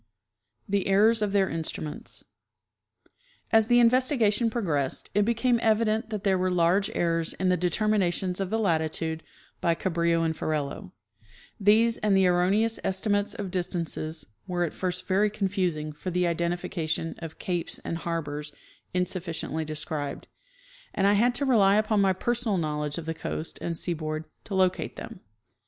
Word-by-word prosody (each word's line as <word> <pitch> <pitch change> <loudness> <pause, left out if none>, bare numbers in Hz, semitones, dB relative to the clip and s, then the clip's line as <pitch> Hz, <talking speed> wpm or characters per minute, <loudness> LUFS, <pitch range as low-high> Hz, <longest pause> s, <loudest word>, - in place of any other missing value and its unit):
The 200 -1 0
Errors 215 +3 +4
of 210 -2 0
their 195 -1 +3
Lutrimients. 160 -2 -4 1.3
As 225 -1 +5
the 240 - +5
investigation 240 -2 +3
progressed 160 - -1
it 205 0 +3
became 235 +1 +2
evident 220 0 +2
that 210 -3 -4
there 190 -2 +2
were 185 0 +1
large 180 +3 +2
errors 165 -1 0
in 185 0 0
the 180 - +4
determinations 180 0 0
of 195 -2 -2
the 220 - 0
latitude 160 -4 0 0.4
by 170 -1 +2
Ca 190 - -2
brillo 170 0 +2
and 160 0 0
Ferrelo; 145 -11 -3 0.7
these 220 +3 +4
and 205 -2 +3
the 190 - +4
erroneous 190 +6 +2
estimates 205 +2 0
of 200 -3 -5
dis 180 -1 -1
tances 165 -2 -3 0.2
were 175 -1 0
at 170 - -2
first 180 -1 -3
very 200 +3 +3
confusing 185 -7 -1
for 165 +5 -6
the 180 0 +1
identification 170 -1 -1
of 165 -2 -8
capes 175 -2 -2
and 165 - -3
harbors 150 -3 -4 0.4
insufficiently 170 -3 -2
described, 150 -1 -4 0.7
and 195 - +2
I 200 - +5
had 240 +4 +3
to 280 - +1
rely 205 -7 +5
upon 215 -1 +2
my 190 -1 +4
personal 235 +1 0
knowledge 150 -2 -2
of 170 - -5
the 160 - -2
coast 160 0 -5
and 170 -1 -2
seaboard 155 -2 -2 0.2
to 200 - -4
locate 185 -1 +1
them. 230 -5 -8
185 Hz, 155 wpm, -27 LUFS, 165-210 Hz, 1.3 s, As